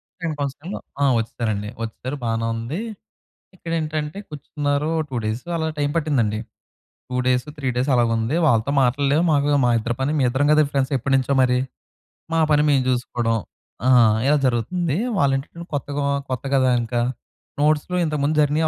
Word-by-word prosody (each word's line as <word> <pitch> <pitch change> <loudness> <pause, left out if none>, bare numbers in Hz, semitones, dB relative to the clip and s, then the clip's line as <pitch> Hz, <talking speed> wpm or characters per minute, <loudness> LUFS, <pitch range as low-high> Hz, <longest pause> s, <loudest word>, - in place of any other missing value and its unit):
Second 170 -4 -4
కౌన్సెలింగ్‌లో 145 +7 -4 0.2
ఆ! - - +4
వచ్చేసారండి. 110 -2 -2
వచ్చేసారు. 130 +5 -5
బానే 115 -1 -1
ఉంది. 115 +10 -4 0.8
ఇక్కడేంటంటే 160 -1 -3
కూర్చున్నారు. 145 0 -2 0.2
2 130 - -5
డేసు 110 +8 -3
అలా 160 -1 -1
టైమ్ 145 0 +1
పట్టిందండి. 125 -10 +1 0.7
2 125 - -3
డేస్, 125 -1 +2
3 140 -3 -2
డేస్ 125 +3 0
అలాగా 120 -2 +3
ఉంది. 115 +7 -1
వాళ్ళతో 115 -1 +2
మాటలు 130 +3 +1
లేవు. 160 +4 +3
మాకు 145 -1 +2 0.2
మా 120 - +3
ఇద్దరి 120 +2 -2
పని 135 +3 +1
మేమిద్దరం 130 +2 +2
కదా, 155 0 +5
ఫ్రెండ్స్ 135 0 0
ఎప్పటినుంచో 135 +1 +1
మరి. 125 -1 +3 0.8
మా 165 - +3
పని 150 0 +4
మేము 135 -2 +3
చూసుకోవడం 120 -2 0 0.5
ఆహ్, 120 -4 +6
ఇలా 150 +2 +4
జరుగుతుంది. 140 +7 0 0.2
వాళ్ళ 140 -4 +3
ఏంటంటే, 165 +5 -7
కొత్తగా 145 0 -2 0.3
కొత్త 130 0 -3
గదా 130 -1 +4
ఇంకా, 120 +1 -1 0.6
నోట్స్‌లో 155 +4 +2
ఇంతకుముందు 150 -1 0
జరిగినియి, 150 +2 +2
140 Hz, 155 wpm, -22 LUFS, 120-150 Hz, 0.8 s, ఆహ్